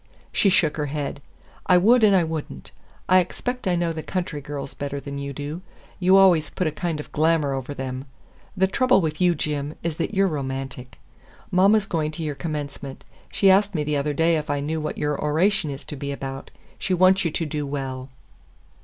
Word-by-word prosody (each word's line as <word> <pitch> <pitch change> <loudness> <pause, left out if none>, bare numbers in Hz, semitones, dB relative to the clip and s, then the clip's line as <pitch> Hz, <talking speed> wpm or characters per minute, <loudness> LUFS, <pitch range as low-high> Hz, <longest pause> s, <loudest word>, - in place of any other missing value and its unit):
She 200 - +3
shook 160 -5 +2
her 150 -1 -1
head. 145 0 -4 0.5
"I 180 - +6
would 225 +6 +5
and 205 -2 +6
I 180 - +4
would 160 -2 -4
n't. 65 - -12 0.4
I 185 0 +6
expect 245 +6 -3
I 180 - +2
know 170 -1 0
the 160 - -4
country 175 -4 -3
girls 140 -1 -6
better 140 0 -4
than 140 0 -6
you 140 0 -4
do. 145 +5 -5 0.4
You 185 +1 +5
always 175 -6 +5
put 185 - -2
a 155 - +1
kind 160 0 -3
of 150 - -8
glamour 155 -2 +2
over 135 +1 -4
them. 130 0 -5 0.5
The 190 - +4
trouble 255 +4 +3
with 160 -1 -2
you, 175 -1 +4
Jim, 150 0 -3
is 165 -2 -2
that 175 - -2
you're 195 +1 +4
romantic. 135 -4 -5 0.5
Mama's 200 +3 +4
going 160 -5 -1
to 160 - -5
your 150 -2 -2
Commencement. 140 -2 -6 0.3
She 195 -1 +4
asked 200 +1 +3
me 150 - 0
the 150 0 0
other 145 +1 -1
day 165 +2 +3
if 150 -1 -5
I 145 0 0
knew 155 +3 -2
what 155 - -4
your 150 -1 -1
oration 160 +3 +2
is 140 0 -7
to 150 - -7
be 140 0 -4
about. 135 -1 -6 0.3
She 185 - 0
wants 185 +2 +4
you 165 - +1
to 165 +1 -2
do 150 -1 -3
well." 135 -2 -4
155 Hz, 210 wpm, -24 LUFS, 140-180 Hz, 0.5 s, I